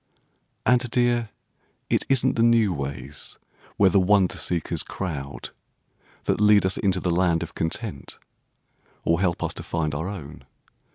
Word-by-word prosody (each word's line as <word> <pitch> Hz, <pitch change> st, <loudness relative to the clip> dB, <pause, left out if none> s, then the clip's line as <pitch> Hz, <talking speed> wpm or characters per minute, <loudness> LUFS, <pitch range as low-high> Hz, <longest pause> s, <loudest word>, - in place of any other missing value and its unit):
And, 125 Hz, -1 st, +3 dB
dear, 120 Hz, -1 st, +1 dB, 0.6 s
it -, -, +1 dB
isn't 130 Hz, -1 st, +2 dB
the 115 Hz, -, +1 dB
new 115 Hz, -4 st, +4 dB
ways 70 Hz, -1 st, -5 dB, 0.4 s
Where 100 Hz, -2 st, +5 dB
the 100 Hz, -, +5 dB
wonder 95 Hz, 0 st, +3 dB
seekers 85 Hz, -3 st, -2 dB
crowd 70 Hz, -7 st, -5 dB, 0.7 s
That -, -, 0 dB
lead 105 Hz, -2 st, +5 dB
us 95 Hz, -, +1 dB
into 95 Hz, -2 st, +1 dB
the 90 Hz, -, -1 dB
land 85 Hz, -1 st, +2 dB
of 85 Hz, -, -8 dB
content, 80 Hz, -, -4 dB, 0.9 s
or 85 Hz, +2 st, +2 dB
help 90 Hz, -3 st, 0 dB
us -, -, -2 dB
to -, -, -7 dB
find 80 Hz, -3 st, -2 dB
our 80 Hz, +5 st, -3 dB
own. 85 Hz, -7 st, -8 dB
95 Hz, 150 wpm, -24 LUFS, 80-105 Hz, 0.9 s, Where